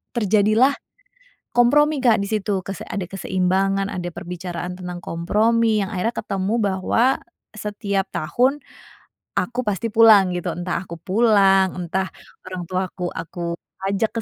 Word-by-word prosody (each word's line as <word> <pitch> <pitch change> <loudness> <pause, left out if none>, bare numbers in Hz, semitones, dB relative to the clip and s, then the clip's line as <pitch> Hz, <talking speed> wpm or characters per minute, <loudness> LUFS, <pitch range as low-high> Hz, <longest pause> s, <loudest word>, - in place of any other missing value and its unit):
terjadilah 215 +4 +3 0.8
kompromi, 295 +5 +4
Kak, 235 -5 +4
di - - -2
situ. 205 -2 0
Kese 195 -1 -5
ada 200 - -3
keseimbangan, 195 +1 0
ada 175 -1 -4
perbicaraan 175 0 -5
tentang 180 -1 -6
kompromi 220 +7 +1
yang 195 - -4
akhirnya 225 +6 -1
ketemu 195 0 -2
bahwa 195 +3 +1 0.5
setiap 200 -2 -2
tahun 255 - +1 0.8
aku 245 +1 -1
pasti 210 +2 -1
pulang, 215 -4 +6
gitu. 175 -1 -3
Entah 175 +1 -3
aku 170 - -7
pulang, 195 -1 +4
entah 185 +2 -1 0.4
orang 185 -1 -5
tuaku 185 -1 -3
aku 170 0 -5 0.3
ajak 200 +4 -1
195 Hz, 125 wpm, -22 LUFS, 180-220 Hz, 0.8 s, pulang